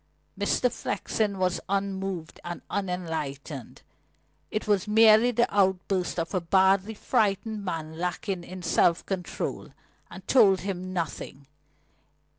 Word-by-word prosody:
Mr. 250 - +1
Flexen 210 -3 -2
was 180 -1 0
unmoved 195 -4 -3
and 175 0 -6
unenlightened. 160 - -4 0.7
It 215 - -3
was 205 -1 +2
merely 220 +2 +6
the 240 0 +3
outburst 190 -2 +1
of 165 +3 -3
a 185 - +1
badly 190 +4 +3
frightened 210 +1 0
man 160 -3 -5
lacking 180 +1 -2
in 185 +1 -9
self 170 -1 +2
control, 190 -3 -4 0.4
and - - -11
told 200 -7 +5
him 185 -1 -4
nothing. 165 -5 -4
190 Hz, 115 wpm, -27 LUFS, 175-205 Hz, 0.7 s, merely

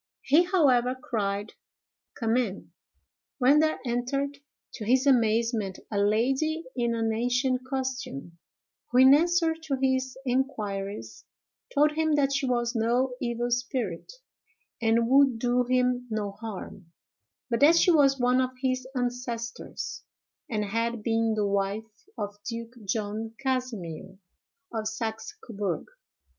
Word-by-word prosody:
He, 315 +6 +5
however, 260 -9 +3
cried, 205 -4 -3 0.6
"Come 225 -1 0
in!" 225 -6 -2 0.7
when 280 +2 +5
there 315 0 +2
entered, 275 +4 -2 0.3
to 225 - -6
his 255 +5 +3
amazement, 230 -5 +2
a 205 - 0
lady 265 +10 +1
in 235 -2 0
an 225 -1 0
ancient 250 +2 0
costume, 255 - -4 0.5
who, 245 - 0
in 260 +1 +8
answer 335 +2 +3
to 320 -3 -3
his 260 -1 0
inquiries, 205 - -3 0.5
told 300 +1 +4
him 315 0 +1
that 280 -1 +2
she 275 -1 0
was 240 -1 0
no 245 +3 +1
evil 240 0 -1
spirit, 240 -7 -2 0.7
and 230 +1 +3
would 270 -1 +5
do 245 +1 +1
him 250 0 +1
no 215 -2 -2
harm; 200 -3 -8 0.6
but 230 - +1
that 305 +5 +7
she 345 +2 +5
was 275 -4 +4
one 250 +1 +3
of 255 0 -3
his 255 -1 -1
ancestors, 245 -2 -4 0.5
and 210 -4 -1
had 230 +2 -2
been 225 0 +1
the 210 -1 +1
wife 200 +2 -2
of 205 -1 -5
Duke 230 0 -6
John 215 +2 -3
Casimer, 225 - -3 0.6
of 220 -1 -2
Saxe 220 0 -4
Coburg. 200 -6 -3
240 Hz, 130 wpm, -27 LUFS, 220-265 Hz, 0.7 s, in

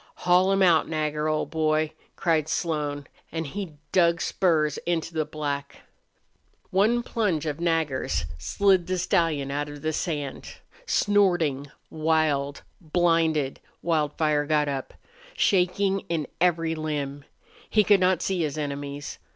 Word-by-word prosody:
"Haul 180 +2 +5
him 195 0 +3
out, 170 -4 +4
Nagger, 155 -1 -1
old 155 0 -1
boy!" 155 -1 +1 0.2
cried 160 -3 +1
Slone, 150 -4 -2 0.3
and 160 0 -3
he 185 +2 -5 0.2
dug 170 -2 +3
spurs 155 -5 +1
into 170 -1 -1
the 155 -1 0
black. 145 -2 -4 0.9
One 220 +6 +3
plunge 205 - -1
of 150 0 -3
Nagger's 150 - 0
slid 190 - +2
the 185 0 -1
stallion 165 -6 +1
out 145 +1 -2
of 145 -1 -10
the 155 0 0
sand. 145 -4 -4 0.3
Snorting, 175 -9 +2 0.2
wild, 155 -3 0 0.2
blinded, 160 -4 +1 0.2
Wildfire 150 -2 +1
got 150 -1 +2
up, 135 -2 -4 0.4
shaking 195 +1 +2
in 165 -3 -1 0.2
every 165 -2 +2
limb. 145 -3 -3 0.5
He 215 - +4
could 205 0 +5
not 185 -2 +2
see 190 -2 0
his 155 -1 -2
enemies. 145 -1 -5
155 Hz, 130 wpm, -26 LUFS, 145-175 Hz, 0.9 s, Haul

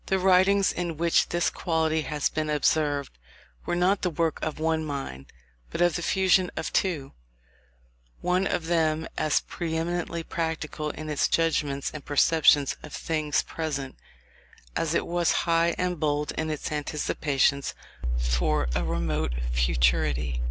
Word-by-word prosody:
The 190 - +2
writings 190 +1 +4
in 170 -3 -3
which 170 +1 +2
this 175 0 +1
quality 160 -2 0
has 150 0 -1
been 155 -1 -2
observed, 145 - 0 0.5
were - - 0
not 185 +3 +2
the 180 - +1
work 165 -1 -1
of 155 - -3
one 160 0 0
mind, 135 - -5 0.4
but - - -5
of 175 -2 +3
the - - -2
fusion 185 0 +3
of - - -3
two, 155 -8 0 1.1
one 180 +2 +1
of 160 - -1
them 160 -1 +1
as 155 -2 +2
pre 160 -2 -4
eminently 170 0 -2
practical 160 -2 -3
in 155 +1 -7
its 150 -2 +1
judgments 150 -4 0
and 155 -2 -7
perceptions 145 -1 +4
of 155 - -10
things 155 -2 0
present, 140 -5 -4 0.8
as 165 0 0
it - - +1
was 175 0 +1
high 170 0 +2
and 180 -2 -1
bold 150 -1 0
in 160 0 -3
its 155 -1 -4
anticipations 145 -2 0 0.4
for - - +1
a - - 0
remote 80 -5 -1 0.2
futurity. - - +1
155 Hz, 145 wpm, -26 LUFS, 140-170 Hz, 1.1 s, writings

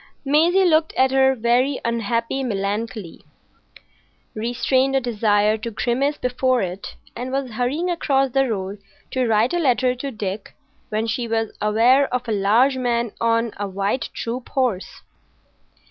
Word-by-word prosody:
Maisie 335 +7 +4
looked 315 -2 +3
at 260 0 +3
her 265 0 +4
very 250 +4 +1
unhappy 235 +2 -1
Melancolia, 205 -3 -3 1.1
restrained 250 +4 0
a - - +4
desire 215 -3 +1
to 230 +2 -4
grimace 260 +6 -1
before 250 0 +1
it, 185 +1 -6 0.2
and 250 +2 -5
was 270 -2 -2
hurrying 250 +10 -1
across 275 -6 +1
the 270 0 +2
road 195 -1 -4 0.3
to 255 -2 0
write 225 +4 +2
a 350 - +1
letter 255 -4 +2
to 260 +3 -5
Dick, 210 -4 -5 0.3
when 215 +1 -1
she 235 +2 -2
was 225 -1 -2
aware 235 +6 +3
of 250 -1 -2
a - - -2
large 220 +7 +3
man 235 -2 0
on 230 -1 +1
a 205 0 -3
white 200 +6 -2
troop 240 +2 -5
horse. 245 -8 -2
240 Hz, 145 wpm, -21 LUFS, 220-265 Hz, 1.1 s, Maisie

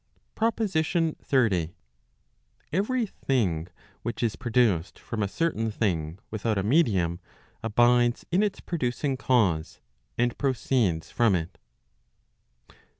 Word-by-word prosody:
PROPOSITION 175 -8 0
XXX, 100 - +2 1.0
Every 225 +7 +1
thing 100 - -1 0.3
which 120 +1 -4
is 115 -3 +1
produced 115 -8 +1
from 115 -2 -5
a 100 - +1
certain 115 -2 -1
thing 85 -7 -1
without 110 0 -1
a 95 - 0
medium,, 100 - +2 0.4
abides 120 +2 +3
in 180 +3 +3
its 210 -2 -1
producing 135 -3 -1
cause, 100 -12 +1 0.4
and 120 0 +1
proceeds 120 - 0
from 115 -5 +3
it. 80 -1 -4
120 Hz, 105 wpm, -27 LUFS, 95-140 Hz, 1.0 s, abides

